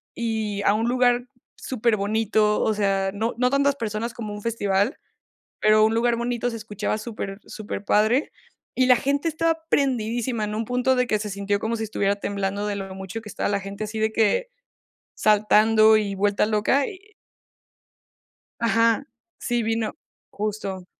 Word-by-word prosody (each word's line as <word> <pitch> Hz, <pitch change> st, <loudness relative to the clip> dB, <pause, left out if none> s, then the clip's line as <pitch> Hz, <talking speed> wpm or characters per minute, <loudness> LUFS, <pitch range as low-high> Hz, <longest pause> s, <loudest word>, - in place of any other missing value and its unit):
y 220 Hz, -3 st, -2 dB
a 200 Hz, -, +4 dB
un 225 Hz, +2 st, 0 dB
lugar 245 Hz, 0 st, +2 dB, 0.3 s
superbonito, 215 Hz, -2 st, +1 dB
o 220 Hz, -, +2 dB
sea, 195 Hz, -2 st, 0 dB
no 220 Hz, +3 st, -2 dB
no 250 Hz, 0 st, +2 dB
tantas 280 Hz, 0 st, +2 dB
personas 230 Hz, -1 st, -3 dB
como 215 Hz, -3 st, -5 dB
un 205 Hz, -, -7 dB
festival, 205 Hz, 0 st, 0 dB, 0.6 s
pero 215 Hz, 0 st, +4 dB
a -, -, +6 dB
un 220 Hz, -, +1 dB
lugar 235 Hz, 0 st, +2 dB
bonito. 240 Hz, 0 st, -1 dB
Se 230 Hz, -, -6 dB
escuchaba 210 Hz, -1 st, -3 dB
super 215 Hz, -3 st, -6 dB
superpadre, 215 Hz, +4 st, 0 dB, 0.4 s
y 255 Hz, 0 st, +3 dB
la 250 Hz, -, +7 dB
gente 280 Hz, +5 st, 0 dB
estaba 325 Hz, +1 st, 0 dB
prendidísima, 240 Hz, -3 st, 0 dB
en 210 Hz, 0 st, -4 dB
un 225 Hz, 0 st, -2 dB
punto 250 Hz, +2 st, +1 dB
de 250 Hz, 0 st, +2 dB
que 215 Hz, -2 st, +1 dB
se 210 Hz, 0 st, -4 dB
sintió 200 Hz, +1 st, -1 dB
como 225 Hz, +2 st, -2 dB
si 225 Hz, -, -3 dB
estuviera 200 Hz, -1 st, 0 dB
temblando 200 Hz, 0 st, -2 dB
de 205 Hz, -, -2 dB
lo 195 Hz, -1 st, -6 dB
mucho 190 Hz, +3 st, -6 dB
que 210 Hz, -, -11 dB
estaba -, -, -2 dB
la 200 Hz, -1 st, 0 dB
gente 200 Hz, +2 st, -6 dB
así, 220 Hz, +1 st, -5 dB
de 220 Hz, 0 st, +1 dB
que 230 Hz, -, +1 dB, 0.7 s
saltando 215 Hz, +1 st, +5 dB
y 200 Hz, -2 st, -2 dB
vuelta 205 Hz, +1 st, +2 dB
loca 220 Hz, +6 st, +2 dB
y 405 Hz, +1 st, -11 dB, 1.5 s
Ajá. 230 Hz, -1 st, +2 dB, 0.3 s
Sí, 240 Hz, -1 st, -1 dB
vino 225 Hz, -1 st, -1 dB, 0.4 s
justo. 200 Hz, -3 st, -4 dB
220 Hz, 165 wpm, -24 LUFS, 205-240 Hz, 1.5 s, la